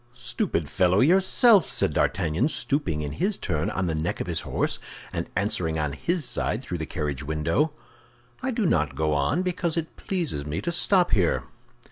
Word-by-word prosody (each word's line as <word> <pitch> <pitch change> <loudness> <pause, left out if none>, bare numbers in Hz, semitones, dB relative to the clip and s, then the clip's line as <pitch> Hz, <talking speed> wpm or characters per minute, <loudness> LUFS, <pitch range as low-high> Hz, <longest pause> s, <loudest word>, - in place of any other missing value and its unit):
"Stupid 120 - -2
fellow 90 +5 +2
yourself!" 190 - +5
said - - +1
D'Artagnan, 80 - +1
stooping 120 - -1
in 75 - -4
his 195 +3 0
turn 80 -4 -1
on 95 - -1
the 85 - -1
neck 80 +2 -2
of - - -2
his - - -1
horse, - - -1 0.3
and - - -3
answering 90 -4 0
on 75 -2 -1
his 170 - -1
side 110 +1 -1
through 90 -9 -4
the 80 - -4
carriage 75 -6 -3
window. 80 - 0 0.7
"I 260 - -1
do 230 -4 0
not 75 - +1
go 75 +1 +1
on 75 - +1
because 175 -2 -1
it 165 -1 -3
pleases 165 - -2
me 75 +2 -3
to 170 - -1
stop 180 +1 +3
here." 90 -5 +2
95 Hz, 180 wpm, -25 LUFS, -, 0.7 s, yourself